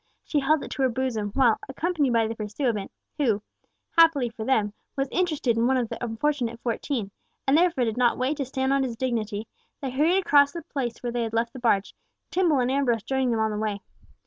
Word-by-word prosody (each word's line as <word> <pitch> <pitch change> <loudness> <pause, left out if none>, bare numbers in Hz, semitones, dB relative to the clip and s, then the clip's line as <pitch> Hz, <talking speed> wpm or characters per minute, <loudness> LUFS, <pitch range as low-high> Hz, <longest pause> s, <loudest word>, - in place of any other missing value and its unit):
She 300 - 0
held 290 +2 +2
it - - -8
to - - -3
her 260 - +4
bosom, 235 -4 -2
while, 250 -5 +4
accompanied 300 -1 0
by 230 -1 +3
the 220 - -2
pursuivant, 215 -1 -2 0.3
who—happily 275 - +1
for 225 -1 -7
them—was 220 +3 -1
interested 305 -10 +1
in 230 +1 +3
one 265 0 +3
of 240 -3 -1
the - - -6
unfortunate 235 0 -1
fourteen, 230 -3 -2 0.4
and 270 - +5
therefore 335 -5 +3
did 225 -1 -1
not 245 -1 +3
wait 265 +4 0
to 275 - -2
stand 265 +1 0
on 275 - +2
his 250 -3 -2
dignity, 220 -4 -2 0.3
they 270 -2 -4
hurried 310 +8 +3
across 285 -6 +4
to 340 - -5
the - - -26
place 250 -5 -3
where 240 - -2
they 240 0 -1
had 225 -1 -3
left 230 +1 0
the 260 - -8
barge—Tibble 260 - 0
and 250 +1 +1
Ambrose 250 -5 +1
joining 265 -1 0
them 225 -2 +1
on 220 0 +1
the 210 - -3
way. 210 -2 -2
250 Hz, 210 wpm, -26 LUFS, 225-280 Hz, 0.4 s, and